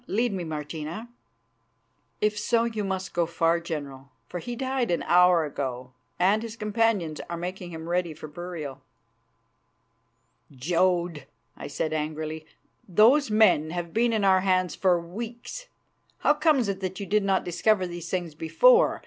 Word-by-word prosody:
Lead 230 Hz, +2 st, 0 dB
me, 185 Hz, -2 st, -3 dB
Martina." 160 Hz, +7 st, -6 dB, 1.1 s
"If 210 Hz, 0 st, +2 dB
so, 230 Hz, +2 st, +1 dB
you 225 Hz, -3 st, -2 dB
must 190 Hz, -1 st, -3 dB
go 170 Hz, -1 st, +1 dB
far, 170 Hz, 0 st, +1 dB
General, 140 Hz, -5 st, -6 dB, 0.2 s
for 180 Hz, -, -5 dB
he 240 Hz, +7 st, -5 dB
died 260 Hz, -1 st, -1 dB
an 170 Hz, -, 0 dB
hour 180 Hz, -2 st, +5 dB
ago, 130 Hz, -3 st, -5 dB, 0.3 s
and 195 Hz, +4 st, +3 dB
his 230 Hz, -1 st, -6 dB
companions 210 Hz, -7 st, 0 dB
are 170 Hz, -, -3 dB
making 180 Hz, +1 st, -5 dB
him 160 Hz, -1 st, -8 dB
ready 175 Hz, -2 st, -1 dB
for 155 Hz, -, -9 dB
burial." 155 Hz, -4 st, -7 dB, 1.7 s
"Jodd," 170 Hz, +1 st, 0 dB, 0.3 s
I -, -, -7 dB
said 155 Hz, +2 st, -2 dB
angrily, 155 Hz, 0 st, -4 dB, 0.4 s
"those 230 Hz, -, +5 dB
men 210 Hz, -8 st, +4 dB
have 170 Hz, 0 st, -5 dB
been 235 Hz, +2 st, +2 dB
in 220 Hz, -2 st, 0 dB
our 190 Hz, -1 st, +5 dB
hands 185 Hz, -1 st, +1 dB
for 180 Hz, -2 st, +2 dB
weeks. 235 Hz, -, -7 dB, 0.5 s
How 295 Hz, -, +5 dB
comes 295 Hz, -, +2 dB
it 195 Hz, -1 st, -2 dB
that 185 Hz, -1 st, -4 dB
you 200 Hz, -, -4 dB
did 210 Hz, +2 st, +1 dB
not 195 Hz, -1 st, +1 dB
discover 185 Hz, +3 st, +2 dB
these 175 Hz, -1 st, -7 dB
things 175 Hz, -4 st, -2 dB
before? 470 Hz, -, +4 dB
180 Hz, 155 wpm, -26 LUFS, 160-215 Hz, 1.7 s, hour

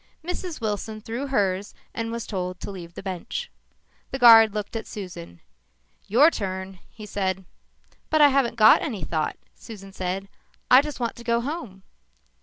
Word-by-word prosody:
Mrs. 355 Hz, -1 st, -4 dB
Wilson 215 Hz, 0 st, -3 dB
threw 230 Hz, +6 st, -5 dB
hers 200 Hz, -6 st, -1 dB, 0.2 s
and 230 Hz, 0 st, -3 dB
was 235 Hz, -1 st, -4 dB
told 180 Hz, -2 st, -4 dB
to -, -, -6 dB
leave 175 Hz, -3 st, -10 dB
the -, -, -8 dB
bench. 190 Hz, -, -5 dB, 0.6 s
The 265 Hz, -, -4 dB
guard 225 Hz, -3 st, +8 dB
looked 210 Hz, +2 st, -5 dB
at 225 Hz, -, -4 dB
Susan. 85 Hz, -, -9 dB, 0.7 s
"Your 275 Hz, +10 st, +6 dB
turn," 190 Hz, -, -5 dB
he 215 Hz, -, -11 dB
said. 190 Hz, -2 st, -2 dB, 0.6 s
"But 310 Hz, -, +2 dB
I 295 Hz, -1 st, +8 dB
haven't 265 Hz, -4 st, +1 dB
got 220 Hz, -1 st, +7 dB
any 220 Hz, -, -4 dB
thought," 155 Hz, 0 st, -2 dB, 0.2 s
Susan 195 Hz, -3 st, -12 dB
said. 190 Hz, +1 st, -3 dB, 0.4 s
"I 255 Hz, +2 st, +9 dB
just 295 Hz, -1 st, -7 dB
want 235 Hz, -2 st, -2 dB
to 235 Hz, -, -10 dB
go 235 Hz, 0 st, +1 dB
home." 240 Hz, -, -6 dB
215 Hz, 165 wpm, -24 LUFS, 190-240 Hz, 0.7 s, I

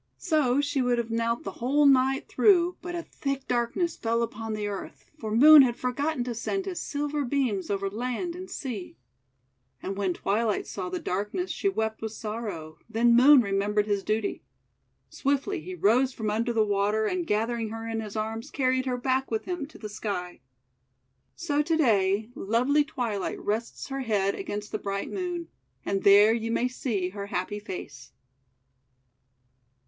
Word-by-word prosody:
So 290 Hz, -6 st, +2 dB
she 285 Hz, -1 st, 0 dB
would 245 Hz, -1 st, +2 dB
have 235 Hz, -1 st, -2 dB
knelt 230 Hz, +1 st, 0 dB
the 195 Hz, -, -4 dB
whole 285 Hz, +4 st, +3 dB
night 270 Hz, -1 st, +4 dB
through, 360 Hz, -4 st, +4 dB
but 350 Hz, 0 st, -5 dB
a 340 Hz, -, -3 dB
thick 275 Hz, -4 st, -4 dB
darkness 245 Hz, +8 st, 0 dB
fell 230 Hz, +1 st, 0 dB
upon 225 Hz, -1 st, -4 dB
the 210 Hz, -1 st, -3 dB
Earth, 200 Hz, -2 st, -7 dB
for 220 Hz, -, -4 dB
Moon 295 Hz, +7 st, +9 dB
had 245 Hz, -3 st, +3 dB
forgotten 255 Hz, +2 st, -1 dB
to 245 Hz, 0 st, -3 dB
send 380 Hz, -, -2 dB
his 375 Hz, -3 st, -4 dB
silver 290 Hz, 0 st, -2 dB
beams 245 Hz, -8 st, -1 dB
over 200 Hz, -1 st, -1 dB
land 250 Hz, -, -3 dB
and 370 Hz, +1 st, -8 dB
sea. 230 Hz, -9 st, -6 dB, 0.8 s
And 195 Hz, -, -4 dB
when 190 Hz, -3 st, -1 dB
Twilight 215 Hz, +1 st, 0 dB
saw 185 Hz, -2 st, -5 dB
the 180 Hz, -, -3 dB
darkness, 205 Hz, -, -2 dB
she 395 Hz, -, 0 dB
wept 220 Hz, -, -2 dB
with 220 Hz, -1 st, -4 dB
sorrow, 210 Hz, -9 st, -6 dB
then 235 Hz, +1 st, +4 dB
Moon 265 Hz, +2 st, +8 dB
remembered 205 Hz, +1 st, +1 dB
his 205 Hz, -2 st, 0 dB
duty. 215 Hz, 0 st, -1 dB, 0.7 s
Swiftly 285 Hz, +7 st, -1 dB
he 370 Hz, +2 st, -7 dB
rose 255 Hz, -, +3 dB
from 215 Hz, -3 st, -2 dB
under 230 Hz, +3 st, 0 dB
the 225 Hz, -2 st, +2 dB
water, 205 Hz, +1 st, +1 dB
and, 350 Hz, +7 st, -1 dB
gathering 225 Hz, 0 st, 0 dB
her 225 Hz, +1 st, -6 dB
in 225 Hz, 0 st, -2 dB
his 215 Hz, -1 st, -6 dB
arms, 220 Hz, +1 st, -3 dB
carried 260 Hz, -1 st, 0 dB
her 250 Hz, -1 st, 0 dB
back 260 Hz, +1 st, 0 dB
with 220 Hz, -1 st, -2 dB
him 350 Hz, -6 st, -3 dB
to 315 Hz, -, -15 dB
the 215 Hz, -, -7 dB
Sky. 200 Hz, -4 st, -5 dB, 1.0 s
So 295 Hz, -4 st, 0 dB
to 320 Hz, +2 st, +1 dB
day 215 Hz, -5 st, +2 dB
lovely 250 Hz, +9 st, +2 dB
Twilight 230 Hz, -8 st, -3 dB
rests 225 Hz, +6 st, -3 dB
her 270 Hz, 0 st, -3 dB
head 200 Hz, -5 st, +1 dB
against 210 Hz, -, -5 dB
the -, -, -2 dB
bright 200 Hz, 0 st, -3 dB
Moon, 355 Hz, -3 st, -4 dB, 0.4 s
and 195 Hz, -1 st, 0 dB
there 205 Hz, +2 st, +7 dB
you 230 Hz, 0 st, -2 dB
may 240 Hz, +2 st, +1 dB
see 225 Hz, -7 st, -2 dB
her 200 Hz, +1 st, -6 dB
happy 205 Hz, +1 st, -3 dB
face. 145 Hz, -10 st, -8 dB
230 Hz, 175 wpm, -27 LUFS, 210-275 Hz, 1.0 s, Moon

